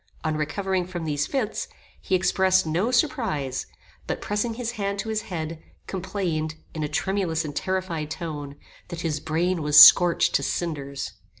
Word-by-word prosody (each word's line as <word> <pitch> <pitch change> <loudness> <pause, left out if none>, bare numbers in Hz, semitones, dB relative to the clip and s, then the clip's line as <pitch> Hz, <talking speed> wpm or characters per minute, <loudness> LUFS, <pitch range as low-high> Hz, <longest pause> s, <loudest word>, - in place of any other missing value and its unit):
On 155 -1 -1
recovering 180 +4 -1
from 175 -3 -5
these 145 -2 -1
fits, 240 -6 -2 0.3
he 190 - 0
expressed 185 0 +3
no 170 +8 0
surprize; 230 - 0 0.4
but - - -2
pressing 210 +3 -2
his 235 -1 -3
hand 200 -3 -3
to 220 +2 -4
his 220 -1 -1
head, 165 -5 -5 0.2
complained, 175 -5 -3 0.2
in 155 - -4
a 150 - -1
tremulous 170 -1 -1
and 145 -1 -6
terrified 185 -5 -2
tone, 150 -4 -6 0.3
that 175 -2 -6
his 155 -3 -1
brain 165 +3 -1
was 150 -1 +6
scorched 175 -1 +8
to - - +2
cinders. 140 -5 -3
175 Hz, 160 wpm, -25 LUFS, 155-195 Hz, 0.4 s, scorched